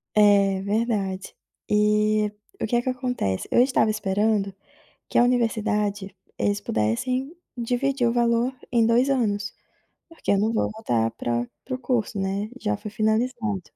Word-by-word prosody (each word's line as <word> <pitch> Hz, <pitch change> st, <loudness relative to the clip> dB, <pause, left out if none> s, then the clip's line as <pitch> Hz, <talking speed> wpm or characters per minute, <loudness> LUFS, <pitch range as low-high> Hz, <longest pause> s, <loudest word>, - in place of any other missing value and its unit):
É 200 Hz, -2 st, +5 dB
verdade, 200 Hz, -3 st, -1 dB, 0.3 s
e, 210 Hz, 0 st, +2 dB, 0.3 s
o -, -, +1 dB
que 220 Hz, -, -1 dB
é -, -, +2 dB
que 255 Hz, -, -2 dB
acontece? 250 Hz, -, -2 dB
Eu -, -, +5 dB
estava 255 Hz, -4 st, +3 dB
esperando 205 Hz, 0 st, 0 dB, 0.6 s
que -, -, 0 dB
a -, -, +7 dB
universidade, 210 Hz, -5 st, 0 dB, 0.2 s
eles 205 Hz, 0 st, 0 dB
pudessem 250 Hz, -, -1 dB, 0.2 s
dividir 245 Hz, +2 st, 0 dB
o 230 Hz, -, +1 dB
valor 240 Hz, +1 st, +2 dB, 0.2 s
em 235 Hz, -2 st, +4 dB
2 240 Hz, +4 st, +3 dB
anos, 215 Hz, -6 st, 0 dB, 0.6 s
porque 330 Hz, -1 st, -3 dB
eu 200 Hz, -, +4 dB
não 215 Hz, +3 st, +1 dB
vou 220 Hz, -, +1 dB
voltar 120 Hz, -, 0 dB
pra 120 Hz, +1 st, -2 dB, 0.2 s
para 260 Hz, -, -3 dB
o -, -, -8 dB
curso, 240 Hz, -4 st, -1 dB
né, 195 Hz, +2 st, -2 dB
já 105 Hz, -, 0 dB
foi 210 Hz, -, -7 dB
finalizado. 220 Hz, -1 st, 0 dB
215 Hz, 155 wpm, -24 LUFS, 200-240 Hz, 0.6 s, a